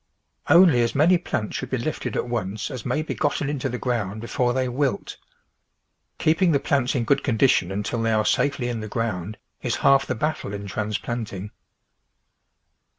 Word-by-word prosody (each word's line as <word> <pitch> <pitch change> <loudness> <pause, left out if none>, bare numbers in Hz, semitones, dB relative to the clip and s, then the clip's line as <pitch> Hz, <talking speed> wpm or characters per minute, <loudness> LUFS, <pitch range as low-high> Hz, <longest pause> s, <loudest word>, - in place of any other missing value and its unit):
Only 170 -9 +7
as 115 - 0
many 170 +5 +5
plants 110 -10 -3
should 130 - -4
be 130 - -1
lifted 125 +6 -3
at - - -1
once 110 0 -3
as 125 -5 -6
may 155 - 0
be - - -4
gotten 145 -1 -1
into 140 -3 -2
the 125 - -3
ground 110 -5 -2
before 120 +2 0
they 130 0 0
wilt. 135 +2 -2 1.0
Keeping 165 +2 +3
the 140 - +3
plants 135 -2 0
in 125 - +1
good 135 +5 +2
condition 115 -7 +2
until 105 +4 -2
they 115 - +1
THE 110 - +2
VEGETABLE 110 - +2
GARDEN 105 - +3
are - - +1
safely 135 -3 -4
in 120 -2 -3
the 110 - -5
ground 110 -3 -3 0.2
is - - -1
half 135 0 +5
the 130 - -1
battle 120 -5 -2
in 100 0 -6
trans 105 +1 -2
planting. 105 -2 -5
120 Hz, 195 wpm, -24 LUFS, 110-140 Hz, 1.0 s, Only